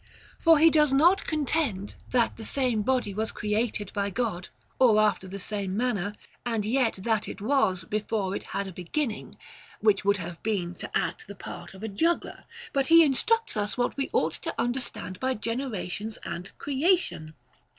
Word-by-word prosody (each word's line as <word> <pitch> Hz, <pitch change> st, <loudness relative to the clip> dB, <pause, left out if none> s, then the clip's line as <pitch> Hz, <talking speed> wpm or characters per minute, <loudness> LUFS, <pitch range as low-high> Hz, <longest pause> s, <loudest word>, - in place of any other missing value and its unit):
For 330 Hz, -1 st, +6 dB
he 320 Hz, +2 st, +6 dB
does 300 Hz, -2 st, +4 dB
not 335 Hz, +8 st, +4 dB
contend, 285 Hz, -9 st, -1 dB, 0.2 s
that 245 Hz, -2 st, +2 dB
the 225 Hz, -, -9 dB
same 245 Hz, -2 st, 0 dB
body 245 Hz, -3 st, 0 dB
was 220 Hz, +2 st, -1 dB
created 210 Hz, 0 st, -2 dB
by 200 Hz, -1 st, 0 dB
God 200 Hz, -4 st, -2 dB, 0.3 s
or 230 Hz, -5 st, +6 dB
after 210 Hz, -3 st, +2 dB
the 195 Hz, +2 st, -6 dB
same 200 Hz, -1 st, -2 dB
man 250 Hz, +2 st, +1 dB
ner, 205 Hz, +1 st, -3 dB, 0.3 s
and 225 Hz, -4 st, -1 dB
yet 240 Hz, +1 st, +2 dB
that 220 Hz, -1 st, 0 dB
it -, -, -7 dB
was 210 Hz, -6 st, +1 dB
before 210 Hz, 0 st, -2 dB
it -, -, -5 dB
had 200 Hz, -, -3 dB
a 190 Hz, -, -8 dB
being, 215 Hz, -, -3 dB, 0.2 s
— -, -, -21 dB
which 210 Hz, -3 st, +3 dB
would 200 Hz, +1 st, +3 dB
have 170 Hz, -2 st, -7 dB
been 190 Hz, -5 st, -1 dB
to -, -, -7 dB
act 175 Hz, -1 st, -3 dB
the 200 Hz, -, -9 dB
part 195 Hz, -, -9 dB
of 190 Hz, -, -11 dB
a -, -, -2 dB
juggler; 330 Hz, +12 st, -1 dB, 0.3 s
but 275 Hz, -1 st, +1 dB
he 330 Hz, 0 st, +8 dB
in 285 Hz, -3 st, +3 dB
structs 455 Hz, -, +1 dB
us 210 Hz, +1 st, -1 dB
what 245 Hz, -, 0 dB
we 275 Hz, -, -2 dB
ought -, -, +1 dB
to -, -, -4 dB
understand 235 Hz, -6 st, -2 dB
by 260 Hz, 0 st, 0 dB
generations 220 Hz, -3 st, -3 dB
and 180 Hz, +3 st, -6 dB
creation. 280 Hz, -, 0 dB
220 Hz, 185 wpm, -27 LUFS, 200-265 Hz, 0.3 s, he